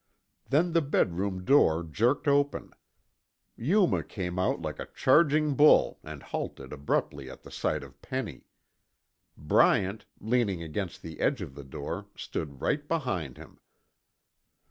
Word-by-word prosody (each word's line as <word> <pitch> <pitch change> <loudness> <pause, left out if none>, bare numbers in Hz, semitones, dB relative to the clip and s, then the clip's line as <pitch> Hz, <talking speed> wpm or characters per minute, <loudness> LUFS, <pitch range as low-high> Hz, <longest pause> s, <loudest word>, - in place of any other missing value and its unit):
Then 165 +5 +2
the 165 - +4
bedroom 95 - -1
door 85 - +4
jerked 115 - 0
open. 145 0 +1 0.8
Yuma 180 - +2
came 90 -3 -4
out 90 - +1
like 80 -2 -5
a - - -5
charging 150 +1 +4
bull 150 +3 +5
and - - -9
halted 65 0 -5
abruptly 70 -1 -2
at - - -12
the - - -12
sight - - -1
of 70 0 -15
Penny. 130 -4 -5 0.9
Bryant, 95 +6 +2
leaning 110 -6 0
against 85 +3 -5
the 80 -2 -9
edge - - +1
of 65 - -9
the 70 - -9
door, 65 - -6
stood 70 -4 -5
right 145 0 0
behind 100 - -2
him. - - -14
100 Hz, 135 wpm, -28 LUFS, -, 0.9 s, bull